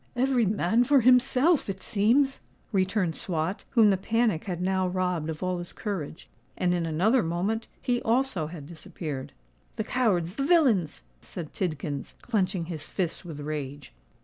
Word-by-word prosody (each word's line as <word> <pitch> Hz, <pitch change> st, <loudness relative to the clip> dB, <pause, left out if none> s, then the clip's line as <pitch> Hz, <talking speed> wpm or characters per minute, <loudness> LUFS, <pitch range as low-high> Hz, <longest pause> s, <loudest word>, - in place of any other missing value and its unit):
"Every 250 Hz, -3 st, +2 dB
man 210 Hz, +3 st, +2 dB
for 275 Hz, +1 st, +4 dB
himself, 255 Hz, -, +4 dB
it 190 Hz, -1 st, -5 dB
seems," 255 Hz, +7 st, +2 dB, 0.3 s
returned 190 Hz, -3 st, +1 dB
Swot, 170 Hz, +2 st, -2 dB
whom 215 Hz, -3 st, +7 dB
the 190 Hz, -, +2 dB
panic 220 Hz, -3 st, 0 dB
had 180 Hz, -4 st, -3 dB
now 185 Hz, 0 st, +1 dB
robbed 180 Hz, -3 st, -1 dB
of 160 Hz, +2 st, -5 dB
all 185 Hz, -1 st, -1 dB
his 175 Hz, -, -7 dB
courage; 180 Hz, -7 st, -5 dB, 0.3 s
and 180 Hz, -1 st, +1 dB
in 170 Hz, -2 st, 0 dB
another 200 Hz, +11 st, +3 dB
moment 195 Hz, +6 st, -1 dB
he 245 Hz, -2 st, 0 dB
also 230 Hz, -, +1 dB
had 155 Hz, -3 st, -9 dB
disappeared. 155 Hz, -3 st, -7 dB, 0.4 s
"The 220 Hz, -, -2 dB
cowards—the 215 Hz, -2 st, 0 dB
villains!" 260 Hz, -, +3 dB, 0.2 s
said 160 Hz, -4 st, -8 dB
Tidkins, 155 Hz, -5 st, -3 dB
clenching 190 Hz, -6 st, 0 dB
his 160 Hz, -3 st, -7 dB
fists 175 Hz, -4 st, -2 dB
with 160 Hz, -4 st, -7 dB
rage. 145 Hz, -2 st, -5 dB
185 Hz, 150 wpm, -27 LUFS, 165-230 Hz, 0.4 s, whom